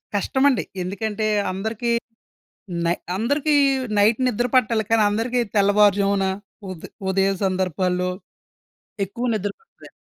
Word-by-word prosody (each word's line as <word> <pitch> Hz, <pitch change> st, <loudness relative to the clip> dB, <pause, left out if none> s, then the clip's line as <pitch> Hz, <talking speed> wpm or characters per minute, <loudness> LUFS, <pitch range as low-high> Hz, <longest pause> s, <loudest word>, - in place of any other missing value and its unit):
కష్టం 265 Hz, +7 st, +1 dB
అండి. 255 Hz, -, 0 dB, 0.2 s
ఎందుకంటే 215 Hz, +3 st, -2 dB, 0.2 s
అందరికీ 220 Hz, +5 st, -2 dB, 0.9 s
నై 170 Hz, +1 st, +2 dB, 0.2 s
అందరికీ 285 Hz, +7 st, +1 dB, 0.4 s
నైట్ 215 Hz, +3 st, +4 dB
నిద్ర 240 Hz, 0 st, 0 dB
పట్టాలి 230 Hz, -3 st, +3 dB
కానీ 225 Hz, -1 st, +4 dB
అందరికీ 230 Hz, +4 st, -1 dB, 0.2 s
తెల్లవారు 205 Hz, 0 st, +5 dB
జామున, 200 Hz, -1 st, +1 dB, 0.5 s
ఉద్ 175 Hz, -4 st, -9 dB, 0.2 s
ఉదయం 195 Hz, +1 st, +2 dB
సందర్భాల్లో, 180 Hz, -1 st, 0 dB, 1.0 s
ఎక్కువ 235 Hz, +6 st, -5 dB
నిద్ర 205 Hz, -1 st, -2 dB
పడతదండి. 450 Hz, -, -18 dB
205 Hz, 115 wpm, -22 LUFS, 195-235 Hz, 1.0 s, తెల్లవారు